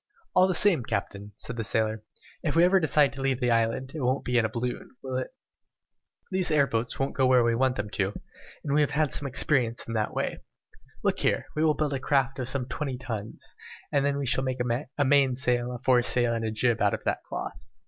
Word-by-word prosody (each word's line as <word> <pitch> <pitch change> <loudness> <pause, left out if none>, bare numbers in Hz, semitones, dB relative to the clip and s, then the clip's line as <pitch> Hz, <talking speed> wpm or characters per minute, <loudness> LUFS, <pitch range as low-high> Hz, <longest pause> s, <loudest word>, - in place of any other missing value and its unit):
"All 185 +1 +5
the 185 - 0
same, 195 -8 +5
captain," 100 -1 -4
said 115 - -5
the 115 - -2
sailor, 110 0 -1 0.4
"if 145 -4 -1
we 165 - +5
ever 185 +2 +5
decide 150 -3 +3
to 135 - -6
leave 135 -2 0
the 125 -2 +1
island, 115 +3 0
it 155 - -5
won't 130 +2 0
be 125 -1 +2
in 115 - +1
a - - -1
balloon, 120 +3 -5
will 130 -1 -4
it? 130 - -2 1.0
These 185 -1 +1
air 150 -3 +4
boats 115 -2 -2
won't 135 0 -1
go 130 -1 +2
where 125 -1 +5
we 115 0 +2
want 130 +2 +1
them 105 -2 -4
to 100 - 0
go, - - -9 0.4
and 140 - -2
we 150 - +4
have 145 - +2
had 150 0 0
some 145 - 0
experience 125 -3 +1
in 115 - -4
that 110 -1 -1
way! - - -2 0.6
Look - - +1
here, - - +1
We 155 - +1
will 155 -1 +3
build 150 -2 -1
a 135 - -2
craft 135 -1 0
of 125 0 +1
some 135 -3 +2
twenty 135 0 -4
tons, 115 -4 -7 0.4
and 140 -1 +2
then 140 0 0
we 140 - -2
can 130 +1 +1
make 130 -1 -2 0.4
a 145 - +2
main 135 -2 +4
sail, 125 -1 0
a 125 - -5
fore 125 0 +3
sail, 120 -1 +2
and 115 -1 -2
a - - -1
jib 115 +1 0
out 100 - +3
of - - -11
that - - -1
cloth. - - -6
130 Hz, 240 wpm, -27 LUFS, 115-140 Hz, 1.0 s, All